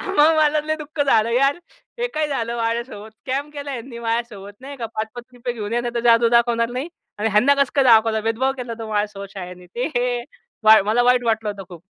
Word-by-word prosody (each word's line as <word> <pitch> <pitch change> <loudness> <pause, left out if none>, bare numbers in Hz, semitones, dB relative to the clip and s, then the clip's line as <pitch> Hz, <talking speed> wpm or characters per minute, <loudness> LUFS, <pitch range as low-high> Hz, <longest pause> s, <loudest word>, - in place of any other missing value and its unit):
हां, - - -4
मग 310 +2 +5
मला 310 -1 +5
तर - - -13
लय 310 0 0
दुःख 305 0 -7
झालं 230 -4 +3
यार! 275 +5 +2 0.4
हे 485 - 0
काय 305 0 0
झालं 235 -4 -2
माझ्यासोबत? 230 -2 -3
स्कॅम 270 +6 -4
केला 285 -1 -7
ह्यांनी 235 -1 -7
माझ्यासोबत. 230 -3 -3
नाही 280 +2 -9
का? 235 -3 -4
पाच, 220 0 -4
₹5-₹5 245 0 -6
घेऊन 210 -2 -5
या 240 - +1
नाहीतर 240 0 -3
जादू 230 0 +5
दाखवणार 235 -1 +2
नाही 260 +7 -4 0.3
आणि 220 +2 0
ह्यांना 245 +8 +4
कसं 280 -2 +1
काय 275 -2 +3
दाखवलं? 225 -2 +5
भेदभाव 230 +5 0
केला 245 -2 -5
होता 225 -1 -7
माझ्यासोबत 205 -2 -3
शाळनी, 180 -1 -9
ते 240 +8 -3
हे 245 0 0 0.4
वाई 215 -1 +8
मला 220 +4 +2
वाईट 250 0 +3
वाटलं 220 -2 0
होतं 200 -1 -8
खूप. 175 -3 -12
235 Hz, 220 wpm, -21 LUFS, 220-260 Hz, 0.4 s, वाई